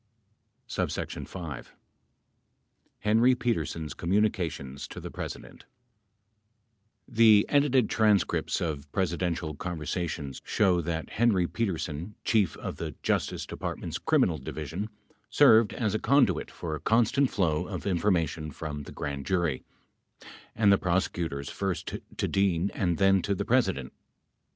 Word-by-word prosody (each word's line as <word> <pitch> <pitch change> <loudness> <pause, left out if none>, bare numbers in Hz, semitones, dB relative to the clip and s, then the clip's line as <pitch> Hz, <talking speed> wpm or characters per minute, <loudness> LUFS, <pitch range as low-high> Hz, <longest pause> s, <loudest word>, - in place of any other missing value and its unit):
34 - - -3
5. 85 -8 -8 1.3
henry 115 +4 +4
peteesen's 110 -10 -2
communications 85 -8 -1
to - - -8
the - - -7
president - - -8 1.4
The 110 -4 +6
edited 135 -5 +3
transcripts 105 -7 +2
of 75 -3 -3
Presidential 85 -3 -1
conversations 80 -3 -4
show 90 -4 +2
that 80 -1 -4
Henry 105 -6 +3
Petersen, 85 -2 -3
Chief 105 -9 +2
of - - -6
the - - -5
Justice - - 0
Department's - - -5
Criminal 80 -4 +2
Division, 80 +9 -5 0.4
served 110 -1 +6
as 110 -4 -1
a 110 - 0
conduit 120 - +3
for 80 -2 -5
a 75 - -3
constant 120 +4 +3
flow 80 -6 0
of - - -6
information 85 -5 0
from 75 -1 -6
the 70 - -10
grand 70 -1 -5
jury 85 -8 0 0.9
and 105 -2 +4
the 100 - +5
prosecutors 85 -6 -1
first 95 -3 -3 0.2
to - - 0
Dean 95 -2 +1
and 90 -5 0
then 95 -1 +4
to 100 +1 -1
the 100 - -3
President. 110 - +1
90 Hz, 120 wpm, -28 LUFS, 80-105 Hz, 1.4 s, The